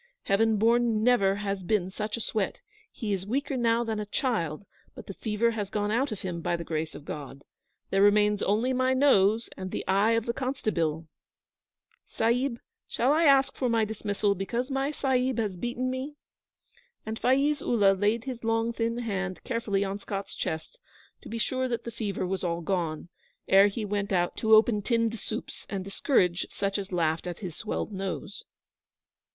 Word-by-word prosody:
Heaven 220 +2 +2
born, 230 0 +3
never 200 -5 +4
has 200 -1 -3
been 185 -1 0
such 210 +3 -3
a - - -4
sweat! 210 -3 -2 0.3
He 215 -4 -3
is 190 0 -3
weaker 275 +4 -1
now 235 -1 +2
than 220 -2 -2
a 210 - -4
child; 200 - -1 0.3
but - - -10
the 195 - -7
fever 220 +3 0
has 210 -3 -3
gone 205 0 -1
out 255 +4 +1
of 210 - -5
him, 175 -3 -4
by 170 - 0
the 170 - -4
grace 160 -1 -3
of 145 - -10
God. 140 -2 -7 0.5
There 195 - +3
remains 210 0 +4
only 225 +6 +1
my 255 +1 +2
nose 230 -5 +4
and 185 0 -5
the - - -4
eye 200 +4 +3
of 230 -1 +1
the 235 - -1
constabeel. 215 - -1 1.0
Sahib, 235 +2 0 0.3
shall 255 +5 +2
I 325 +2 +3
ask 275 -2 +5
for 255 - 0
my 225 -1 +2
dismissal 205 -1 -1
because 235 +7 -3
my 270 +1 0
Sahib 260 -4 0
has 210 -5 -1
beaten 240 +6 -2
me?' 265 +3 -4 0.9
And 220 +1 -4
Faiz 275 +4 +2
Ullah 205 -5 +4
laid 210 +4 +1
his 250 -3 -6
long 225 +1 +1
thin 230 0 -1
hand 195 -6 -3
carefully 225 -5 -1
on 200 +1 -3
Scott's 200 -1 -5
chest 160 0 -4 0.4
to - - -11
be 230 - -4
sure 255 +3 0
that 235 -2 -3
the 235 - -6
fever 205 -4 -3
was 190 +1 -2
all 170 -1 -1
gone, 170 -3 -2 0.4
ere 195 +1 +7
he 210 +2 -3
went 205 0 -2
out 175 -2 +1
to 220 -1 +5
open 215 -1 +4
tinned 230 0 0
soups 220 - -6
and 195 -2 -3
discourage 190 -3 +1
such 200 0 -2
as 195 -1 -6
laughed 165 -1 0
at 175 -1 -4
his 180 -6 -6
swelled 220 0 -3
nose. 195 +1 -5
215 Hz, 185 wpm, -28 LUFS, 195-235 Hz, 1.0 s, ere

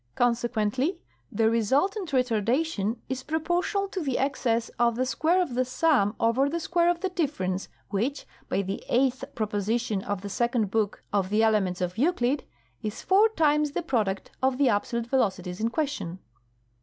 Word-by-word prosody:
Consequently, 245 - +1 0.3
the 220 +2 +2
resultant 285 - +1
retardation 245 -1 0
is 260 0 -3
proportional 350 +7 -1
to 380 - -3
the 270 -5 -1
excess 235 -4 0
of 235 -1 +3
the 255 +2 0
square 320 +7 +2
of 345 -9 0
the 255 +1 +2
sum 255 -5 +2
over 245 +5 +2
the 335 +3 -2
square 340 +1 +2
of 350 0 0
the 380 - 0
difference, 270 - -2 0.2
which 245 +9 -2 0.2
(by 200 - 0
the 195 +1 -4
eighth 260 +1 +2
proposition 215 0 -1
of 205 -2 -3
the 200 - -6
second 235 -1 0
book 215 -2 -1
of 195 -2 +1
the 215 +2 +3
Elements 195 -5 +2
of 180 +4 -2
Euclid) 275 -3 +1 0.4
is 215 0 -5
four 405 +4 +5
times 300 -6 +2
the 345 - -2
product 215 - -1
of 260 -1 +2
the 275 -2 +4
absolute 230 +3 0
velocities 195 -8 -1
in 225 +1 +1
question. 270 - -2
245 Hz, 165 wpm, -27 LUFS, 210-300 Hz, 0.4 s, four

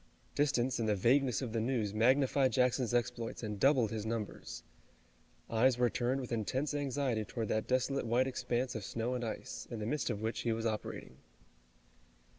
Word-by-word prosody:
Distance 130 -4 +1
and 110 -2 0
the 105 - +3
vagueness 125 +4 +3
of 115 -3 -4
the 115 - +1
news 115 -4 0
magnified 130 +3 +3
Jackson's 125 -1 +2
exploits 120 -1 -1
and 105 -2 -4
doubled 130 -4 +4
his 110 -2 -3
numbers. 110 -1 -4 0.8
Eyes 120 +2 +3
were 125 -1 +3
turned 130 +3 0
with 125 - -7
intense 130 +6 -1
anxiety 135 -5 0
toward 110 0 -4
that 110 - 0
desolate 130 0 +1
white 120 +3 +3
expanse 125 -1 -1
of 110 - -4
snow 115 +4 -2
and 125 -1 -2
ice, 110 - -5
in 120 - -5
the 105 - -4
midst 150 +5 -1
of 100 - -2
which 110 +1 -1
he 115 - 0
was 115 +1 -3
operating. 105 - -4
120 Hz, 180 wpm, -33 LUFS, 110-130 Hz, 0.8 s, doubled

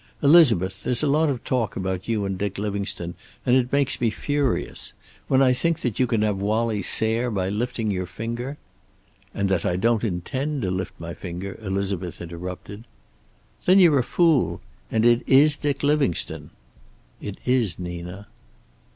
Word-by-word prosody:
Elizabeth, 130 - +5
there's 125 +2 +2
a - - +2
lot 150 +2 +3
of 130 -4 -3
talk 125 -4 -1
about 95 -1 -3
you 110 -3 -1
and 95 -1 -2
Dick 100 +1 -3
Livingstone, 100 -4 -3 0.3
and 125 - +4
it 125 -1 +1
makes 140 -3 +1
me 120 - +3
furious. 145 +3 -2 0.3
When 135 0 +4
I 130 -1 +4
think 165 +5 0
that 120 -5 -2
you 130 - +3
can 115 -3 +1
have 105 -2 0
Wallie 110 +1 0
Sayre 110 +5 +3
by 95 -4 -1
lifting 115 +1 -2
your 90 -2 -3
finger 120 +8 -5 0.4
" - - -35
"And 100 - 0
that 95 -2 +1
I 90 - 0
don't 115 +4 +1
intend 130 - -2
to 90 - -1
lift 95 0 -4
my 85 0 -6
finger," 90 +2 -7
Elizabeth 95 -3 -3
interrupted. 90 +5 -8 0.8
"Then 185 +2 +6
you're 165 -7 +6
a - - +1
fool. 165 -1 +2 0.3
And 110 0 +1
it 120 0 +5
is 145 +3 +6
Dick 145 -2 -2
Livingstone!" 145 - 0 0.7
"It 100 - -6
is, 120 -8 +1
Nina." 90 +2 -7
110 Hz, 170 wpm, -24 LUFS, 95-130 Hz, 0.8 s, Then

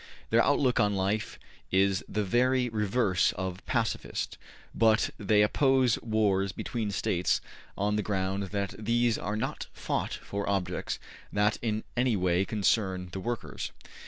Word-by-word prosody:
Their - - +5
outlook 125 -3 +2
on 105 -2 +3
life 100 +3 -1 0.3
is 95 0 +2
the 105 - 0
very 125 +5 +2
reverse 105 -3 +1
of 95 0 -4
pacifist, 115 -3 -2 0.3
but 110 -1 +3
they 105 0 +4
oppose 130 +1 +3
wars 100 -4 +1
between 110 +1 -3
States 90 -2 +1 0.4
on 105 +1 +1
the - - +1
ground 95 -1 -1
that 100 +1 -2
these 115 +1 +2
are 105 +2 -2
not 110 - -3
fought - - -2
for 100 0 -4
objects 95 -3 -1 0.3
that 105 +1 +2
in 110 -2 -1
any 125 -1 +2
way 90 0 +2
concern 95 -3 0
the 95 - -4
workers. 120 +4 -4
105 Hz, 140 wpm, -29 LUFS, 95-115 Hz, 0.4 s, Their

